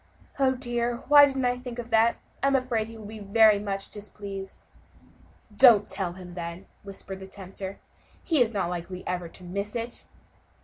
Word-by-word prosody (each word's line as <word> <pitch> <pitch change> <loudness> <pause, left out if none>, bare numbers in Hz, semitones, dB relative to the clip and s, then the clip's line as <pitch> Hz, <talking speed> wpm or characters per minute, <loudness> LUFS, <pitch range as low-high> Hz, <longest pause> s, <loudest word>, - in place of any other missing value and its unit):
Oh! 265 -1 +4
dear, 240 -1 -1
why 290 -1 +9
didn't 270 -2 -1
I 245 0 +1
think 250 -1 -7
of 240 -1 -6
that? 225 +1 +4 0.3
I 275 - +3
am 275 - +3
afraid 245 -4 0
he 225 0 -10
will 215 - -10
be 215 +1 -8
very 210 +1 +5
much 195 -1 -4
displeased." 200 -2 -8 0.9
"Don't 230 -3 +7
tell 190 -3 -2
him, 180 -1 -10
then," 170 +1 -6 0.2
whispered 195 -1 -7
the 190 - -9
tempter, 195 0 -8 0.5
"he 315 -6 +2
is 230 -2 +3
not 190 -5 -1
likely 180 +1 -6
ever 180 -1 -2
to 185 - -14
miss 200 +5 -4
it." 235 +1 -4
210 Hz, 180 wpm, -27 LUFS, 190-240 Hz, 0.9 s, why